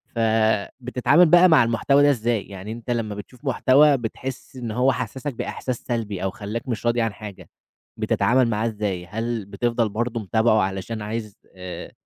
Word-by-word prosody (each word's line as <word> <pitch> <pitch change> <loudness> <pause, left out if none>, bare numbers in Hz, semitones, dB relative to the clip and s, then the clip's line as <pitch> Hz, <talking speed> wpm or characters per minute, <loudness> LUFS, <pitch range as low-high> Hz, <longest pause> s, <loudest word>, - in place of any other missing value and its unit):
فبتتعامل 115 - +2
بقى 175 +2 +6
مع 160 - +6
المحتوى 130 +5 +2
ده 145 - +6
إزاي؟ 120 -5 0
يعني 100 +2 -8
أنت 115 +1 -8
لمّا 110 -3 -2
بتشوف 120 +6 -11
محتوى، 140 +2 +4
بتحس 130 +3 -6
إن 120 -3 -5
هو 125 +4 +2
حسسك 130 +3 -4
بإحساس 125 +2 -4
سلبي، 105 -6 -4
أو 95 - 0
خلّاك 110 +4 -6
مش 120 -2 -4
راضي 120 0 +2
عن 115 -2 -1
حاجة، 105 -2 -10 0.5
بتتعامل 130 0 +2
معاه 110 +1 0
إزاي؟ 105 -5 -3
هل 110 +3 -3
بتفضل 115 +2 -1
برضه 115 +3 -2
متابعه 110 +1 +2
علشان 95 +4 -3
عايز، 105 -1 -5 0.2
آآ، 90 -1 -8
115 Hz, 165 wpm, -23 LUFS, 105-125 Hz, 0.5 s, بقى